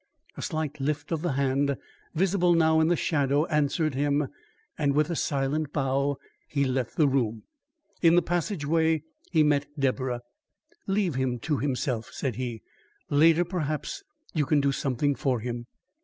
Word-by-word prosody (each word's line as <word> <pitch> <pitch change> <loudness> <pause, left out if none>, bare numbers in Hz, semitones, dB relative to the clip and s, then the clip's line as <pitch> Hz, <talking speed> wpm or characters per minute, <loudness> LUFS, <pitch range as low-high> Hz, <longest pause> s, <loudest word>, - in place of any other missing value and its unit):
A - - -7
slight 155 -4 -3
lift 145 +2 -2
of 160 -2 0
the 175 -4 0
hand, 140 0 +1 0.4
visible 180 0 +3
now 160 -1 +4
in 160 - +4
the 175 - +3
shadow, 145 -2 +1
answered 150 0 +1
him; 145 +1 +1 0.5
and 140 -2 +1
with 150 +3 +2
a - - -1
silent 145 +1 -1
bow 140 0 0 0.3
he 140 -1 0
left 130 -2 -2
the 155 - +5
room. 115 -5 0 0.6
In 170 -1 +6
the 175 - +4
passageway 160 -3 +1 0.3
he 160 -3 +4
met 145 -1 +2
Deborah. 130 -3 0 0.7
"Leave 195 -4 +1
him 130 -1 0
to 150 +1 0
himself," 125 -4 -1
said 125 -6 -3
he. 120 -4 -4 0.5
"Later, 165 +4 +5
perhaps, 155 -4 -3 0.3
you 150 -4 +1
can 150 - +3
do 140 0 +2
something 135 +1 0
for 130 -3 0
him." 120 +1 -5
145 Hz, 155 wpm, -27 LUFS, 135-160 Hz, 0.7 s, In